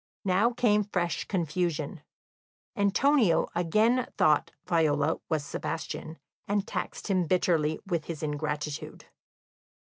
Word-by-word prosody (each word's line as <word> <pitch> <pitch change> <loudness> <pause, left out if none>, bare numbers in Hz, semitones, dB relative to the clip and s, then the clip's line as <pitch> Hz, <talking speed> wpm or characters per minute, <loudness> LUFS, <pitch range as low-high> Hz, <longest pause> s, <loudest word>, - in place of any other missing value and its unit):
Now 195 +5 +3
came 210 -3 +3
fresh 180 -4 -2
confusion; 170 -3 -2 0.7
Antonio 205 - +3
again 215 +9 +2
thought 150 -1 +3 0.2
Viola 155 -2 +2
was 155 -3 0
Sebastian, 160 0 -5 0.3
and 205 0 0
taxed - - -4
him 185 -4 +1
bitterly 160 -4 +2
with 170 -5 -2
his 160 -2 -6
ingratitude. 150 0 -4
170 Hz, 100 wpm, -28 LUFS, 155-200 Hz, 0.7 s, Now